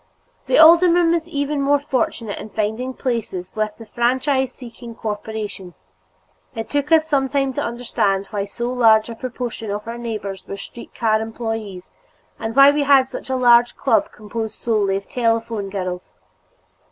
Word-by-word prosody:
The - - +3
alderman 340 +1 +6
was 335 -1 0
even 285 -2 -2
more 285 +1 +3
fortunate 250 -6 -2
in - - -8
finding 220 +5 -2
places 225 -8 -3
with 215 -1 -2
the 225 - -11
franchise 260 +3 0
seeking 235 -2 -11
corporations; 210 - -6 0.7
it 225 -1 -6
took 290 +1 -1
us 320 -1 +5
some 275 -3 +1
time 275 -1 0
to - - -2
understand 225 -5 -1
why 200 -2 -2
so 240 +4 -4
large 225 -3 +4
a 230 - -6
proportion 240 -2 -5
of 205 +2 -4
our 235 +1 -5
neighbors 210 -5 -5
were 195 - -6
street 235 +4 -11
car 220 -2 +1
employees 225 -4 -5 0.5
and 225 +1 -4
why 275 +1 +8
we 295 +1 0
had 275 -2 +4
such - - -8
a 260 - 0
large 240 -1 +4
club 225 -6 +1
composed 220 +1 -6
solely 210 -4 0
of 195 - -8
telephone 230 -4 -1
girls. 185 -2 -5
230 Hz, 165 wpm, -20 LUFS, 215-265 Hz, 0.7 s, why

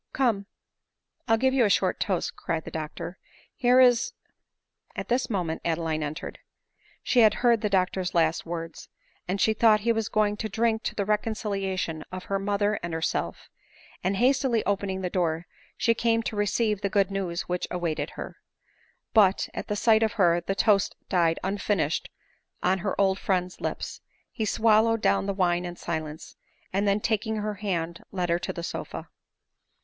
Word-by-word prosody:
" - - -44
Come, 225 -7 +1 0.8
I'll 225 -1 +4
give 260 +3 +2
you 265 -2 +4
a 210 - +3 0.2
toast," 185 -4 -2
cried 165 -2 -3
the - - -7
doctor; 160 +3 -6 0.2
" - - -30
here 250 +1 +6
is 245 -2 +5 0.4
" - - -39
At - - -5
this 250 +2 +1
moment 175 -7 -2
Adeline 165 -1 -1
entered. 150 +2 -5 0.6
She 250 - +2
had 215 -2 +6
heard 235 -3 +5
the 210 - 0
doctor's 185 -1 0
last 165 -1 +2
words, 165 -1 -6 0.4
and, 190 +2 -1
she 220 - +3
thought 215 -1 +4
he 235 +2 +2
was 225 -2 -1
going 210 -1 +1
to 220 0 -3
drink 220 +2 +1
to - - -2
the 200 - -1
reconciliation 195 -6 -1
of 185 0 -6
her 195 0 -1
mother 205 +1 0
and 170 -1 -4
herself; 160 - -2 0.6
and 190 +2 0
hastily 255 -2 +2
opening 200 -1 -1
the 180 - -2
door, 170 -2 0 0.3
she 230 - +3
came 230 0 +1
to 220 - -3
receive 210 0 +1
the 200 - 0
good 195 -1 +2
news 185 -3 -2
which 180 0 -3
awaited 170 -3 -2
her. - - -7 0.8
But, 200 -4 +4
at - - -6
sight 220 +1 +4
of 220 -1 +1
her 175 -4 +3
the 195 +3 -2
toast 200 -1 +3
died 170 -3 +2
unfinished 190 -4 0 0.5
on 190 +1 +2
her 190 +2 -3
old 195 -1 +3
friend's 185 -2 -1
lips; - - -4 0.3
he 220 - -2
swallowed 225 +1 +3
down - - +2
the - - +1
wine 175 -2 +1
in 175 -1 -5
silence, 160 -2 -5 0.4
and 200 +2 +1
then 200 +1 +2
taking 220 0 0
her 210 0 -2
hand 170 -4 -2
led 180 -3 -2
her 170 +1 +2
to - - -3
the 170 - -6
sofa. - - -5
195 Hz, 175 wpm, -27 LUFS, 175-220 Hz, 0.8 s, here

